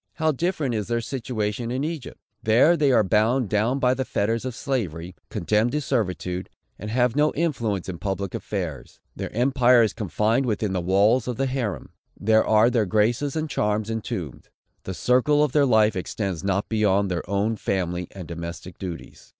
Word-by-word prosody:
How 160 -1 +1
different 155 -3 -1
is 105 -3 -2
their 120 0 0
situation 115 -2 -3
in 130 +3 -2
Egypt! 155 -4 -5 0.2
There 120 +10 +5
they 145 -4 +3
are 120 - +5
bound 110 +4 +2
down 110 +5 +1
by 125 -2 +3
the 130 - -2
fetters 115 0 -1
of 130 -2 -4
slavery, 95 - -3 0.2
condemned 105 +4 +1
to 150 - 0
servitude, 90 - -2 0.3
and 105 - -6
have 125 +1 +1
no 150 +1 +3
influence 120 - -1
in 90 -3 -5
public 100 -1 -3
affairs. 85 - -5 0.2
Their - - -5
empire 125 0 +4
is 110 - 0
confined 110 - 0
within 105 -3 -1
the 90 - 0
walls 100 +7 +3
of 125 - -2
the 135 - +1
Harem. 130 -7 -3 0.3
There 110 +1 +4
are 110 +2 +4
their 115 -5 +1
graces 115 - +1
and 160 0 -1
charms 105 -4 -1
entombed. 95 - -5 0.4
The 95 - -4
circle 135 +7 +3
of 150 - +1
their 145 0 +3
life 110 -3 +4
extends 95 -1 -3
not 100 +1 0
beyond 100 -3 +1
their 85 0 -3
own 100 +3 0
family 90 -3 -2
and 95 -4 -9
domestic 85 +1 -7
duties. 90 -3 -8
110 Hz, 180 wpm, -24 LUFS, 95-125 Hz, 0.4 s, There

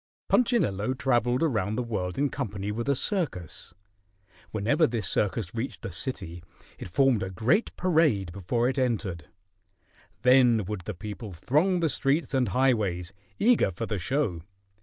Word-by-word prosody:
Punchinello 130 - +2
traveled 125 -1 +1
around 110 - 0
the 125 - -1
world 95 -6 -3
in 140 +1 +2
company 105 -7 -4
with 115 +5 -3
a 140 - +3
circus. 125 - -3 0.7
Whenever 130 +10 +2
this 115 -5 -3
circus 100 -2 -1
reached 120 +3 -5
a - - -4
city, 90 - -5 0.4
it - - -6
formed 125 +4 +3
a 95 - -3
great 120 - +1
parade 155 - +2
before 100 +6 -1
it 130 +1 -1
entered. 100 - -1 1.0
Then 125 -4 +5
would 105 -1 -4
the 105 - -4
people 105 +3 -7
throng 155 - +1
the 165 - +3
streets 140 +4 0
and 130 -2 +2
highways, 100 -7 +1 0.2
eager 235 - +4
for 95 +5 -4
the 105 -3 -3
show. 95 - -1
115 Hz, 150 wpm, -27 LUFS, 95-135 Hz, 1.0 s, Then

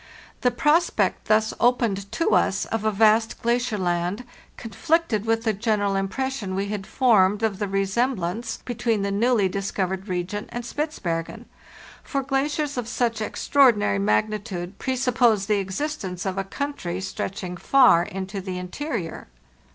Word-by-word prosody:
[he 250 - +4
prospect 300 +8 +1
thus 215 0 +2
opened 230 -5 +1
to 330 - 0
us 190 +1 +2
of 225 -1 -3
a 215 - +2
vast 220 +2 +3
glacier 235 -1 +1
land 175 +3 -1 0.3
conflicted 245 -1 0
with 225 0 +1
the 220 -2 +1
general 205 -1 0
impression 200 +1 -2
we 200 +1 -2
had 205 -2 -4
formed 210 -5 +3
of 210 -3 0
the 205 - -1
resemblance 195 +1 -1
between 230 -3 -1
the 200 - -1
newly 220 0 +2
dis 195 +1 -3
covered 190 +1 -2
region 185 +3 -3
and 240 -1 -5
Spitzbergen; 215 - -3 0.6
for 275 -1 -2
glaciers 285 +2 -1
of 245 -2 -2
such 235 -2 -1
extraordinary 215 - +3
magnitude 185 - -1
presuppose 245 -5 +2
the 210 0 +1
existence 195 - -4
of 190 -1 -1
a 195 - -1
country 195 -8 -4
stretching 190 -1 -4
far 215 -3 +5
into 190 +2 -5
the 185 -1 -5
interior." 180 - -5
210 Hz, 145 wpm, -24 LUFS, 190-245 Hz, 0.6 s, far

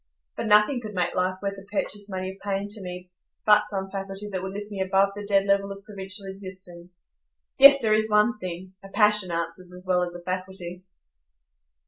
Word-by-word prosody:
But 230 - -3
nothing 210 +5 +4
could 215 -3 -8
make 180 -1 0
life 185 0 0
worth 200 0 -2
the 195 - -11
purchase 205 0 -1
money 185 -1 -3
of 190 - -15
pain 200 0 -2
to 210 0 -7
me, 180 0 -8 0.3
but 210 0 +5
some 195 -2 -3
faculty 195 +1 -6
that 190 -2 -3
would 190 0 -5
lift 205 +1 -7
me 195 -2 -4
above 195 +1 +3
the 205 +1 -7
dead 195 -1 +3
level 200 0 +1
of 195 0 -9
provincial 195 -1 -7
existence. 185 -2 -8 0.5
Yes, 275 +1 +10
there 215 -1 +3
is 220 0 +2
one 210 +1 +3
thing,—a 185 +2 -8
passion 210 -2 +5
answers 170 +2 -4
as 180 +1 -8
well 180 -1 +3
as 175 0 -3
a 175 - -9
faculty." 185 -1 -5
195 Hz, 195 wpm, -25 LUFS, 185-205 Hz, 0.5 s, Yes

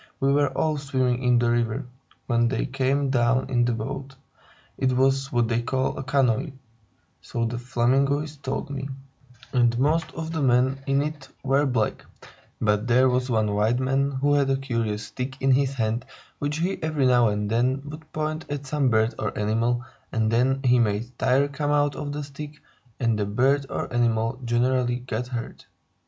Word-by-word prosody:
"We 135 -1 +2
were 145 -1 +3
all 155 -1 +1
swimming 130 -3 0
in 125 -1 +3
the 120 0 +2
river, 115 -1 0 0.4
when 120 -1 +2
they 130 - -1
came 135 +1 0
down 130 +1 +2
in 120 -1 +3
their 120 -1 0
boat. 135 +5 -5 0.6
It 130 -1 +1
was 135 +1 +2
what 120 -2 +2
they 115 0 0
call 130 +2 -1
a - - -4
canoe 135 +1 +1 0.7
(so 115 -1 -2
the 120 +1 -3
Flamingoes 135 +5 +1
told 135 0 -4
me), 140 0 -4 0.6
and 120 -2 +3
most 155 +5 +1
of 160 0 -4
the 160 -2 -2
men 130 +1 +2
in 135 +1 +2
it 150 -2 -6
were 140 +2 +2
black; 115 -5 -1 0.6
but 105 +1 +1
there 130 +2 +4
was 125 +1 0
one 110 -3 +1
white 110 +4 +2
man 135 +2 +1
who 140 +1 +1
had 140 -1 +3
a 135 - +2
curious 115 -6 -2
stick 130 +3 -6
in 135 0 +2
his 135 +1 +2
hand, 115 -1 -1 0.4
which 145 +1 -2
he 180 +4 -1
every 155 -4 0
now 125 -2 +5
and 105 0 -1
then 130 +4 +1
would 155 +1 -10
point 155 +1 -3
at 145 -1 -4
some 140 -1 +1
bird 110 +1 +2
or - - -3
animal, 115 +3 0 0.3
and 110 -1 +1
then 130 +3 +2
he 125 -1 +4
made 110 +1 0
tire 135 +3 +3
come 145 +1 -3
out 145 -1 +2
of 145 -1 -4
the 145 +1 -4
stick, 145 +2 -9 0.4
and 115 -3 +1
the 105 - +1
bird 135 +6 +2
or - - -4
animal 115 +1 +1
generally 120 +1 +1
got 125 -1 -4
hurt. 120 -2 -6
130 Hz, 185 wpm, -25 LUFS, 120-140 Hz, 0.7 s, now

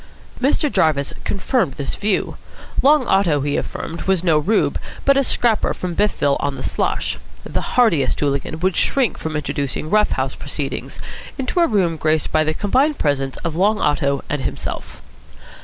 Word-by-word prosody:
Mr. 285 +2 +2
Jarvis 155 -8 +1
confirmed 200 - 0
this 140 -2 -3
view. 205 -1 -1 0.5
Long 290 -1 +5
Otto, 180 -9 +2
he 145 +1 -1
affirmed, 165 - -4
was 190 -3 +2
no 165 -4 +4
rube, 205 +9 +1 0.3
but 275 - +5
a 275 - +3
scrapper 235 -4 +1
from 180 -1 -4
Biffville 165 -9 +2
on 140 -1 -1
the - - -7
Slosh. - - -1 0.2
The - - -3 0.2
hardiest 170 - +3
hooligan 145 +2 -1
would 185 -1 +1
shrink 255 - +1
from 160 -1 -4
introducing 145 0 -3
rough 210 0 +4
house - - -1
proceedings - - -5 0.4
into 265 +5 -1
a 340 - +5
room 180 -7 +1
graced 155 0 0
by 155 - +3
the 155 0 -1
combined 265 - +2
presence 135 -2 -1
of 165 -2 -2
Long 210 +5 +2
Otto 140 -2 +1
and 145 -1 -2
himself. - - -5
170 Hz, 165 wpm, -20 LUFS, 145-215 Hz, 0.5 s, Long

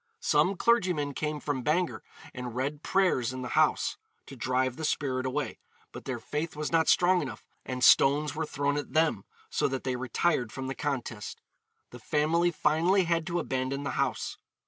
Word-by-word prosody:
Some 195 +2 +2
clergymen 180 -12 +2
came 150 +1 -3
from 145 -3 -2
Bangor 165 +6 0 0.3
and 125 -2 -6
read 140 +3 -2
prayers 175 -13 +2
in 130 0 -6
the 125 - -5
house, - - +2 0.3
to 135 - -10
drive 130 0 0
the 160 - -7
spirit 130 -4 -1
away, 130 - -3 0.3
but - - -10
their 130 -2 -3
faith 150 +8 -4
was 150 0 -3
not 165 -1 +3
strong 180 0 +4
enough, 130 -8 -7 0.2
and 125 0 -3
stones 145 +4 +5
were 155 0 -3
thrown 145 0 -1
at 145 - -5
them, 155 -11 +2 0.3
so - - +1
that 135 0 -3
they 130 -1 -1
retired 125 0 0
from 135 +1 -6
the 135 - -3
contest. 125 -7 -4 0.5
The 125 - -10
family 155 +7 +2
finally 170 +4 +2
had 170 -1 0
to 175 -1 -1
abandon 130 0 -2
the 140 - -2
house. - - -2
145 Hz, 180 wpm, -29 LUFS, 130-160 Hz, 0.5 s, stones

